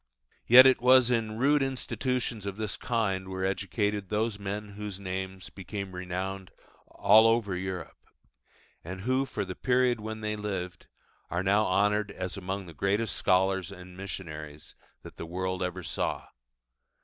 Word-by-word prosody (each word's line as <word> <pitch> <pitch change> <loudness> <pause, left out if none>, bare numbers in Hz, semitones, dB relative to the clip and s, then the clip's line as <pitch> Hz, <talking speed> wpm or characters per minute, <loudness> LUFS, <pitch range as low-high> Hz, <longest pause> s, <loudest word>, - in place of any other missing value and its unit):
Yet 125 +2 +10
it 130 -2 +5
was 125 0 +6
in 110 -2 0
rude 145 +4 +3
institutions 125 -4 -2
of 100 0 -4
this 110 -2 -3
kind 100 -6 -1
that - - -8
were 95 0 -2
educated 100 +1 -1
those 105 0 -1
men 100 +1 -4
whose 100 -1 -7
names 95 0 -5
became 100 0 -6
renowned 95 +1 -4 0.4
all 110 +2 +6
over 115 -4 +2
Europe, 90 -2 -5 0.9
and 95 +3 -7
who 130 +5 +1
for 105 -5 -3
the 90 - -5
period 125 +1 +2
when 110 +1 -6
they 105 0 -2
lived 95 -4 -5 0.4
are 85 +2 -1
now 100 +3 +3
honoured 105 +2 +2
as 90 -1 -4
among 95 0 -4
the 85 - -11
greatest 100 +5 0
scholars 95 0 +2
and 90 -1 -11
missionaries 80 -6 -7 0.3
that - - -12
the - - -5
world 95 +2 -3
ever 90 0 -3
saw. 75 - -3
100 Hz, 155 wpm, -29 LUFS, 95-110 Hz, 0.9 s, Yet